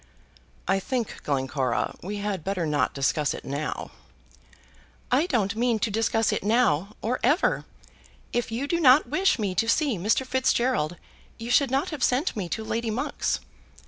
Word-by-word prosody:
"I 195 0 +2
think, 245 +2 -3
Glencora, 130 -3 -1
we 205 +3 -5
had 200 -4 -3
better 190 -2 -1
not 150 -3 0
discuss 140 +2 +1
it - - -9
now." 140 +3 -4 1.2
"I 280 +7 +3
don't 220 - 0
mean 235 0 +1
to 215 +1 -1
discuss 225 +1 +1
it - - -2
now, 210 -4 +2
or 245 +3 0
ever. 320 +6 +2 0.7
If 240 -1 -1
you 240 +5 -2
did 340 +3 0
not 265 -1 +6
wish 370 +5 +2
me 205 -5 -1
to 225 +5 +1
see 275 - +2
Mr. 220 +8 +1
Fitzgerald 250 -10 +1 0.4
you 230 +1 -5
should 275 +1 +4
not 270 +3 0
have 295 -5 -3
sent 265 +7 +1
me 190 -5 -3
to 220 - -3
Lady 230 +1 -2
Monk's. 225 +4 -1
225 Hz, 165 wpm, -26 LUFS, 185-255 Hz, 1.2 s, not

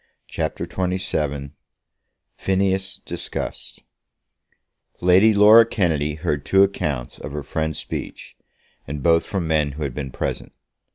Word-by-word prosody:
CHAPTER - - -3
XXVII 75 -7 -2 0.8
Phineas 95 0 -1
Discussed - - -6 1.2
Lady 95 +5 +5
Laura 105 +2 +8
Kennedy 80 -9 0
heard 75 -3 -2
two 95 +5 +5
accounts 75 -10 -2
of 75 - -7
her 75 -1 -4
friend's 80 +1 -2
speech, - - -7 0.5
and 70 0 -5
both 85 -1 +3
from 95 -5 -2
men 75 -3 +1
who 75 +2 -5
had 70 -3 -3
been 70 0 -5
present. - - -4
80 Hz, 120 wpm, -22 LUFS, 75-95 Hz, 1.2 s, Laura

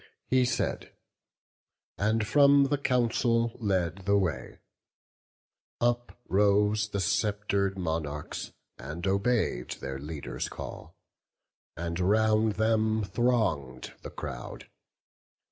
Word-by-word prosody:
He 130 -1 +4
said, - - -2 1.0
and 110 +2 +1
from 140 +2 +5
the 145 -1 +1
council 120 -2 +1
led 95 -4 -1
the 100 0 +4
way. 80 -10 -2 1.2
Uprose 105 -3 +1
the 100 - -2
sceptred 100 +1 0
monarchs, 80 -4 -3 0.3
and 75 +8 -6
obey'd 100 - 0
Their 65 0 -5
leader's 70 -4 -5
call, - - -8 0.8
and 85 +1 -3
round 110 +3 +3
them 110 0 +1
throng'd 95 - 0
the - - -7
crowd. - - -8
105 Hz, 95 wpm, -29 LUFS, 85-115 Hz, 1.2 s, from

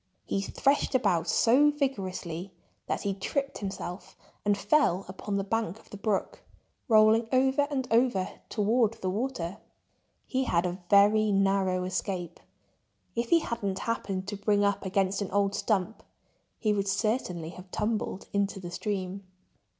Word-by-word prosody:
He 195 - -1
threshed 275 +7 +1
about 175 -9 +2
so 255 - +5
vigorously 195 - -3 0.4
that - - -2
he 200 - 0
tripped 275 +8 -3
himself 190 -2 -6 0.3
and 205 -1 +2
fell 200 - +2
upon 200 +2 -4
the 195 - 0
bank 220 -1 -1
of - - -22
the 205 - -7
brook, 200 -1 -1 0.5
rolling 220 0 +5
over 265 +2 +3
and 265 -3 -2
over 225 -5 +3 0.2
toward 225 +1 +2
the 185 -4 -3
water. 205 -4 -3 0.7
He 260 0 -1
had 175 -5 +1
a 180 +1 -3
very 210 +1 +5
narrow 195 -2 +2
escape. 180 -2 -3 0.8
If 235 0 -1
he 335 -1 +5
hadn't 200 -9 -3
happened 195 -4 -3
to 205 - -3
bring 205 0 +2
up 200 -1 0
against 195 +1 +1
an 200 - -2
old 200 0 +1
stump 205 0 -1 0.6
he 215 -3 +1
would 200 -1 -1
certainly 190 -4 -1
have 180 +2 -11
tumbled 210 -1 -2
into 200 -1 0
the 175 -2 -7
stream. 195 0 -3
200 Hz, 150 wpm, -28 LUFS, 190-230 Hz, 0.8 s, so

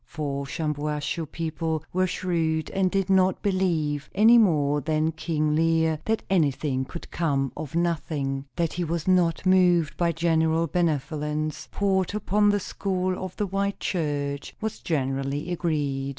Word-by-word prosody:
For 140 -3 -3
Shampuashuh 150 0 -3
people 160 -1 -2
were 185 +1 +2
shrewd, 165 -3 -1
and 190 -1 +1
did 195 0 0
not 190 -1 +3
believe, 160 -7 0
any 225 +4 +7
more 150 -8 +3
than 155 +1 0
King 155 -2 -1
Lear, 160 -1 +2
that 220 0 0
anything 145 -7 +1
could 170 - -9
come 140 -5 0
of 155 -1 -6
nothing. 150 -5 -1
That 170 -2 0
he 175 - -2
was 170 0 -3
not 180 -2 +2
moved 180 -4 +4
by 170 -1 +2
general 165 0 +2
benevolence, 155 -2 -1
poured 190 -2 +1
out - - -6
upon 210 0 +2
the 205 0 +2
school 185 -1 -2
of 185 -1 -6
the 210 - -1
white 200 +1 -2
church, 145 -5 -2
was 220 0 -4
generally 140 +1 -2
agreed. 145 -6 -1
165 Hz, 150 wpm, -25 LUFS, 150-185 Hz, -, any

